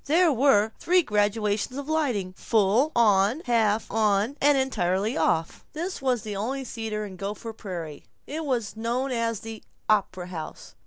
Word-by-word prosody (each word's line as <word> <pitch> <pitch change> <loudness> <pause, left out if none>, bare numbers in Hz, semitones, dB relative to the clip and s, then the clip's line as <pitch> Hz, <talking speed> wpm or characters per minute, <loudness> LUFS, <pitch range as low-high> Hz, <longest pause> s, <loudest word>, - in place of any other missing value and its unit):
There 325 +2 +4
were 225 -5 +4
three 360 +1 +3
gradations 210 +1 0
of 285 0 -5
lighting: 250 -13 0
full 220 +8 +2
on, 215 +3 +3
half 225 -3 +2
on, 215 +3 +2
and 290 0 +5
entirely 210 -4 0
off. 165 0 0
This 340 +1 -4
was 250 -5 0
the 210 -2 -5
only 260 +7 -2
theater 220 -3 -4
in 190 -2 -9
Gopher 210 +4 -5
Prairie. 170 -8 -7 0.2
It 315 +3 -4
was 245 -8 -2
known 240 +4 -1
as 230 -3 -1
the 225 -1 -8 0.3
"op'ra 190 -4 +1
house." 160 -4 -8
225 Hz, 155 wpm, -26 LUFS, 205-265 Hz, 0.3 s, and